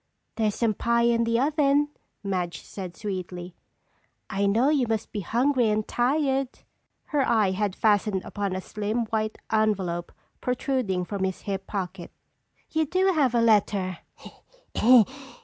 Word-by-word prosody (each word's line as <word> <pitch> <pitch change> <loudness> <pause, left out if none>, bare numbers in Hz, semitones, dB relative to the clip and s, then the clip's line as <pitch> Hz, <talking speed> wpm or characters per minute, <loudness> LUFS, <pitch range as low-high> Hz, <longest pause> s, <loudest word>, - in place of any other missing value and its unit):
"There's 215 -2 0
some 230 -2 +1
pie 235 +3 +1
in 235 0 +3
the 230 0 +1
oven," 290 +1 +2 0.3
Madge 180 -4 -3
said 185 -3 -8
sweetly. 185 -3 -5 0.8
"I 200 +1 +1
know 230 +7 +3
you 280 -5 +2
must 220 -1 -2
be 210 - -3
hungry 245 +4 +2
and 215 0 0
tired." 270 +1 +1 0.6
Her 295 -2 0
eye 220 -7 +3
had 200 0 -1
fastened 205 -3 +2
upon 200 -2 -3
a 185 - -3
slim, 215 +4 -2
white 215 -1 -1
envelope 195 -6 0 0.3
protruding 250 -7 -1
from 200 0 -3
his 190 -1 -2
hip 195 -1 -4
pocket. 185 -3 -5 0.6
"You 315 -1 +1
do 375 +4 +2
have 270 -7 +2
a 235 - +4
letter!" 200 -5 +2
215 Hz, 140 wpm, -26 LUFS, 195-245 Hz, 0.8 s, a